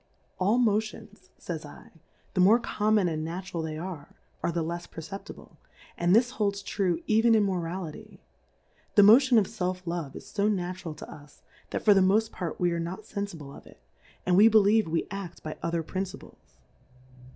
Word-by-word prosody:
Ail 205 +6 +3
Motions, 215 -3 -1
fays 165 -3 -5 0.4
/, - - -38
the 185 - -1
more 210 +6 +6
conir 215 -2 -1
mon 200 -4 +3
and 155 -2 -2
natural 175 +1 -5
they 155 -1 -4
are, 165 -3 -7 0.3
are - - 0
the 170 0 -1
lefs 170 +2 -5
perceptible, 180 +5 -10 0.4
and 175 +2 +3
this 240 +2 +4
holds 200 -4 -1
true 185 -4 -1
even 225 +1 +4
in 215 - +4
Morality, 185 +1 -4 0.8
the 205 - +8
Motion 245 +4 +7
of 210 - +4
Self 185 -3 -4
love 170 -5 -4
is - - -10
fo 205 0 +1
natural 180 -5 -3
to - - -10
us, 145 -1 -15 0.3
that - - -4
for 210 - +8
the 195 - +4
moft 215 +4 +3
part 175 -4 -5
we 175 -1 +2
are 170 - -1
not 175 +5 -5
fenfible 175 -11 -6
of - - -14
it, - - -17 0.5
and 180 - +3
v/e 215 - +8
believe 215 -1 +4
we 165 +1 -1
ad 195 -3 -6
by 155 - -5
other 170 0 -1
Principles. 190 +3 -7
185 Hz, 180 wpm, -27 LUFS, 170-210 Hz, 0.8 s, the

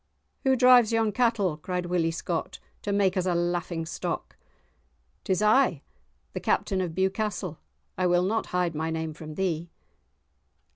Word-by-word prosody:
"Who 265 0 +4
drives 250 -3 +6
yon 225 -1 +2
cattle?" 225 -9 +1
cried 180 +2 -3
Willie 175 -2 +1
Scott, 165 0 -3 0.2
"to 205 - -3
make 200 -1 +2
us 185 -1 0
a 180 - +1
laughing 175 -1 -1
stock?" - - -4 0.9
"'Tis 190 +2 0
I, 215 - +3 0.5
the - - -3
Captain 190 -2 0
of 170 -3 -3
Bewcastle; 190 -3 -1 0.4
I 185 - +3
will 175 0 +3
not 220 +4 0
hide 180 -2 0
my 160 +1 -2
name 160 -1 -3
from 155 0 -9
thee." 170 -2 -1
180 Hz, 150 wpm, -27 LUFS, 165-210 Hz, 0.9 s, drives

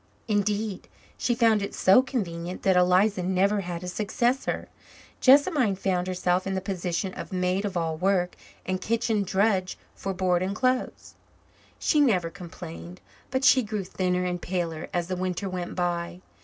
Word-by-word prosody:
Indeed, 210 -1 -1 0.3
she 240 - 0
found 225 -3 +3
it 200 - -4
so 190 +7 +6
convenient 180 -9 -4
that 190 -1 +3
Eliza 185 +2 +3
never 190 +3 +2
had 175 -1 -5
a - - -5
successor. 235 +7 -1 0.5
Jessamine 275 - +5
found 185 -1 -1
herself 185 0 0
in 195 - -1
the - - 0
position 185 -1 -3
of - - -8
maid 185 +2 0
of 195 -3 -2
all 165 -2 -1
work 180 0 +1 0.3
and 185 0 -2
kitchen 225 0 0
drudge 190 -1 +1 0.2
for 195 - -4
board 180 -2 +1
and 190 +2 -2
clothes. 255 +2 -1 0.6
She 300 - +2
never 185 -11 +2
complained, 90 - -9 0.3
but 260 +1 0
she 255 +1 +6
grew 210 -3 -3
thinner 180 0 -1
and 180 -1 -2
paler 170 -3 -3
as 175 -1 -1
the 185 - -2
winter 185 +2 -2
went 180 -2 -4
by. 175 0 -2
185 Hz, 160 wpm, -26 LUFS, 180-210 Hz, 0.6 s, so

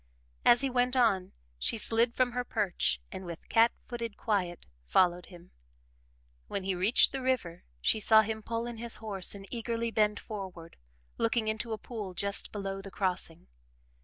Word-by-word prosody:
As 240 +1 +6
he 275 - +1
went 250 +1 +1
on, 200 -7 +3 0.3
she 225 - +1
slid 230 +2 +2
from 255 -1 +2
her 250 +1 -2
perch 175 - 0
and 185 - -6
with 170 -2 -8
cat 230 +1 +5 0.2
footed 235 -3 -5
quiet 185 -6 -1 0.2
followed 175 - +2
him. 175 -2 -14 1.0
When 195 - -3
he 190 0 0
reached 190 +6 +4
the 270 - -3
river 255 -10 -1 0.2
she 220 - +2
saw 220 +1 +6
him 220 0 -3
pull 230 +1 -3
in 240 -1 -6
his 235 0 -1
horse 205 -3 -2
and 195 -1 -9
eagerly 230 -1 -2
bend 210 -2 +2
forward, 185 -6 -8 0.4
looking 230 -1 +1
into 220 +1 -2
a 220 - -1
pool 210 -6 -7
just 200 +2 0
below 195 -1 -4
the 195 - -9
crossing. 180 -4 -2
215 Hz, 170 wpm, -30 LUFS, 190-235 Hz, 1.0 s, As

